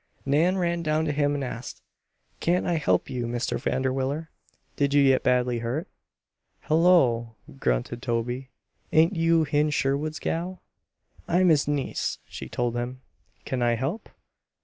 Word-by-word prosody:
Nan 160 +7 +3
ran 170 -1 0
down 155 0 0
to 150 - 0
him 145 0 +1
and 140 - -2
asked: 125 -1 -7 0.6
"Can't 175 +2 +1
I 175 - +1
help 95 - +1
you, 120 -2 -3
Mr. 120 +1 -2
Vanderwiller? 135 +4 -1 0.4
Did 140 0 +1
you 145 - +6
get 135 -1 +4
badly 125 -1 +1
hurt?" 125 - -3 0.8
"Hullo!" 145 -9 +3 0.2
grunted 65 - -1
Toby. 120 +2 -2 0.4
"Ain't 165 +5 +4
you 165 -1 +3
Hen 150 0 +1
Sherwood's 145 +2 0
gal?" 175 +2 -3 0.6
"I'm 180 +1 +3
his 150 -3 +3
niece," 145 -2 -1
she - - -8
told 120 -1 -1
him. 125 +2 -4 0.4
"Can 130 -2 -2
I 120 -1 +3
help?" 135 - -3
140 Hz, 145 wpm, -26 LUFS, 125-160 Hz, 0.8 s, you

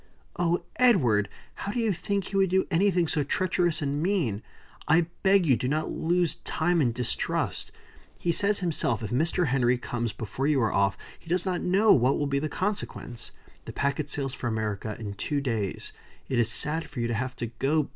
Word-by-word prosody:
"Oh, 175 0 +1
Edward! 125 - +4 0.2
How 200 - -5
do 245 - -2
you 225 -3 +2
think 200 +3 -2
he 195 - -6
would 195 -1 +3
do 190 +1 +2
anything 180 -1 +3
so 150 -2 +1
treacherous 175 +1 0
and 145 +1 -1
mean? 160 - 0 0.5
I 165 +2 +4 0.2
beg 195 -2 +4
you 135 -5 +5
not 155 +2 +1
to - - -6
lose 175 0 0
time 170 +1 +1
in 125 -4 +2
distrust. 120 +1 -2 0.5
He 175 - 0
says 200 +4 +2
himself, 140 -8 0
if 105 - -4
Mr. 165 +7 +1
Henry 125 -1 +2
comes 120 -2 -3
before 110 +6 -3
you 150 -3 +3
are 115 -3 +1
off, 100 0 +2 0.2
he - - -22
does 180 +1 0
not 180 -2 -1
know 200 +4 +4
what 130 +1 +3
will 145 - 0
be 140 0 0
the 155 +2 -2
consequence. 180 - -4 0.3
The - - -7
packet 140 +1 -1
sails 135 -3 -2
for 130 - -4
America 110 -2 -2
in 105 -3 -5
two 145 +8 -2
days. 115 -8 -3 0.3
It 130 - 0
is 115 -1 +3
sad 150 +5 -1
for 145 - -7
you 120 - 0
to 120 - -2
have 125 +3 -2
to 120 - -3
go. 150 +2 +2
150 Hz, 200 wpm, -27 LUFS, 120-175 Hz, 0.5 s, you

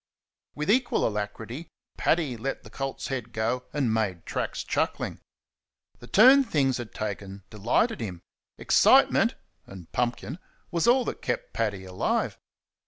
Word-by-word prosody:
With 150 +6 0
equal 250 +2 +2
alacrity, 110 +8 -5 0.3
Paddy 155 -7 +1
let 135 +4 -4
the - - -13
colt's 135 -1 -4
head 125 -4 -4
go 115 +3 -1
and 135 -6 0
made 100 -6 -1
tracks, - - -3
chuckling. - - -2 0.8
The 120 - -12
turn 260 - +7
things 140 - +1
had 120 -2 -6
taken 100 -2 -5
delighted 115 - +1
him. 90 -6 -6 0.3
Excitement - - +5 0.3
(and 95 -4 -11
pumpkin) 125 +5 -2 0.3
was 170 +5 +1
all 250 +1 +5
that - - -4
kept 125 - -3
Paddy 100 -4 -2
alive. 95 0 -1
120 Hz, 135 wpm, -27 LUFS, 105-150 Hz, 0.8 s, turn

